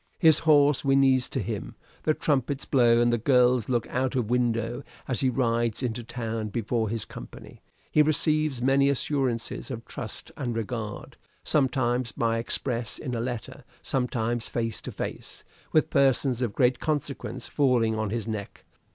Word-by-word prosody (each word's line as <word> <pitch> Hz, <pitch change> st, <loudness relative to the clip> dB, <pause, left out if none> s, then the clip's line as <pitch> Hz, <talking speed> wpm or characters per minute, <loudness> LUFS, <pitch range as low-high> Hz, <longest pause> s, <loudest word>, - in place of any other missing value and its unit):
His 160 Hz, -4 st, +6 dB
horse 145 Hz, -3 st, +4 dB
whinnies 135 Hz, -2 st, +3 dB
to -, -, -2 dB
him; -, -, -4 dB, 0.3 s
the 155 Hz, -, +3 dB
trumpets 140 Hz, -1 st, 0 dB
blow 120 Hz, -3 st, +4 dB
and 120 Hz, 0 st, +3 dB
the 120 Hz, -, +1 dB
girls 125 Hz, -1 st, +3 dB
look 120 Hz, -2 st, +1 dB
out 130 Hz, +1 st, -1 dB
of 120 Hz, -3 st, -1 dB
window 120 Hz, 0 st, 0 dB, 0.3 s
as 125 Hz, -, -1 dB
he 130 Hz, -, +2 dB
rides 120 Hz, -1 st, 0 dB
into 120 Hz, -1 st, -2 dB
town 115 Hz, -2 st, -4 dB
before 110 Hz, +1 st, -1 dB
his 115 Hz, -1 st, -3 dB
company; -, -, -11 dB, 0.3 s
he 150 Hz, -, +5 dB
receives 155 Hz, -3 st, +2 dB
many 135 Hz, +1 st, +4 dB
assurances 135 Hz, -4 st, -2 dB
of 115 Hz, -3 st, -6 dB
trust 120 Hz, -7 st, -6 dB
and 120 Hz, -5 st, -3 dB
regard 110 Hz, -1 st, -5 dB, 0.3 s
sometimes 125 Hz, -4 st, +1 dB
by 115 Hz, -1 st, 0 dB
express 120 Hz, 0 st, -2 dB
in 130 Hz, -4 st, -5 dB
a 115 Hz, -, -1 dB
letter 120 Hz, -2 st, -5 dB, 0.2 s
sometimes 120 Hz, -2 st, -1 dB
face 115 Hz, -2 st, -2 dB
to -, -, -6 dB
face, -, -, -6 dB, 0.3 s
with 155 Hz, -, +2 dB
persons 135 Hz, -2 st, +3 dB
of 115 Hz, -5 st, -2 dB
great 125 Hz, 0 st, +3 dB
consequence 145 Hz, -3 st, -3 dB
falling 125 Hz, -6 st, +2 dB
on 110 Hz, -1 st, -2 dB
his 115 Hz, 0 st, -3 dB
neck. 105 Hz, -3 st, -6 dB
125 Hz, 160 wpm, -27 LUFS, 115-135 Hz, 0.3 s, His